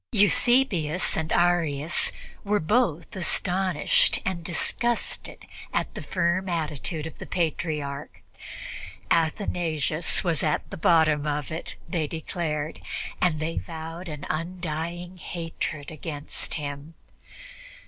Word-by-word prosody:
Eusebius 205 - +4
and 160 0 -2
Arius 170 -3 +4 0.3
were 210 +1 +2
both 170 -3 +1
astonished 185 -2 +2
and 185 -3 -2
disgusted 230 +7 +2 0.3
at - - -1
the - - -6
firm 185 +1 0
attitude 155 -1 -2
of 160 - -8
the - - -7
Patriarch. 150 -4 -2 0.9
Athanasius 165 -2 +1
was 170 -5 +1
at 150 - 0
the - - -4
bottom 155 -3 +4
of 150 0 -2
it, 160 - -3
they 165 -3 -1
declared, 160 -1 -3 0.4
and 165 -4 +3
they 160 +2 -1
vowed 165 +1 -7
an 150 -2 -6
undying 175 +1 -3
hatred 165 -3 -4
against 155 -2 -3
him. 145 +1 -5
165 Hz, 105 wpm, -26 LUFS, 155-175 Hz, 0.9 s, Eusebius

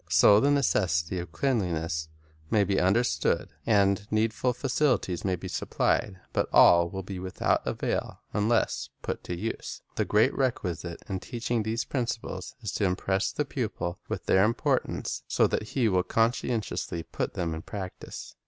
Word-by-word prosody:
So 85 +5 +7
the 140 - +3
necessity 95 - +1
of 85 -2 -6
cleanliness 85 - -1 0.4
may 105 -2 +4
be 100 0 +1
understood, 95 -4 +2 0.2
and 100 -1 +3
needful 110 +3 +1
facilities 125 - 0
may 95 -2 +1
be - - -7
supplied; 95 -3 0
but - - 0
all 85 0 +7
will 95 +1 -5
be 95 0 -6
without 90 0 0
avail - - -2
unless 105 - +1
put - - -3
to 90 - -4
use. 110 +5 -5
The - - +2
great 110 +5 +3
requisite 90 - -2
in 95 -1 -2
teaching 120 0 -2
these 110 +2 -1
prin 125 -4 -1
ciples 110 -6 -5
is 105 -4 -3
to 105 - 0
impress 95 +2 0
the 150 - -1
pupil 110 -10 -3
with - - -4
their 95 - +4
importance, 115 +3 0
so - - +3
that 110 +5 -2
he 120 -4 +4
will 95 -3 +3
conscientiously 115 -5 -1
put - - -4
them 85 -2 -1
in 80 - -5
practise. 95 -1 -7
100 Hz, 160 wpm, -28 LUFS, 90-115 Hz, 0.4 s, So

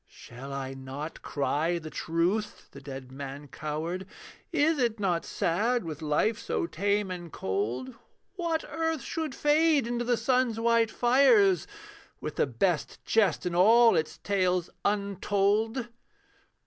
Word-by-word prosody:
Shall 125 +3 -11
I 135 -1 -4
not 135 +4 -7
cry 150 +4 0
the 155 -2 -8
truth?' 180 +6 -1
the 140 - -11
dead 135 -2 -8
man 140 +1 -7
cowered 160 +6 -4 0.4
Is 315 -1 +2
it 230 -3 0
not 180 -4 0
sad, 225 +8 0
with 155 -2 -6
life 155 +9 +1
so - - -2
tame 200 +3 0
and 175 -2 -7
cold, 110 +7 -3 0.4
What 335 -4 -2
earth 325 -2 -2
should 315 -5 -4
fade 300 -2 +3
into 240 0 -2
the 240 0 +1
sun's 250 -3 +1
white 230 -1 +3
fires 280 - +4 0.5
With - - -6
the - - +2
best - - -1
jest 205 -7 +2
in 180 - -1
all 225 +5 +6
its 155 -1 -1
tales 185 -3 0
untold? 205 +4 0
195 Hz, 135 wpm, -28 LUFS, 155-240 Hz, 0.5 s, all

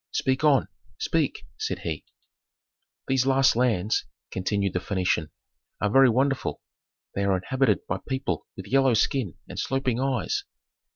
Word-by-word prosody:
"Speak 130 +2 0
on 140 -8 +4 0.3
speak!" 155 -9 0 0.2
said 95 - -2
he. 80 -2 -3 1.0
"These 130 0 +2
last 135 -2 +4
lands," 110 -4 +1 0.3
continued 100 0 -1
the 90 - +1
Phœnician, 90 -5 0 0.5
"are 105 - 0
very 135 +1 +7
wonderful. 135 +3 +1 0.5
They 100 - -1
are 100 -1 +2
inhabited 120 0 +1
by 95 - -2
people 130 0 -2
with 95 - -7
yellow 135 -1 +4
skin 110 - +1
and - - -6
sloping 130 -3 0
eyes. 130 -7 0
125 Hz, 135 wpm, -26 LUFS, 95-135 Hz, 1.0 s, very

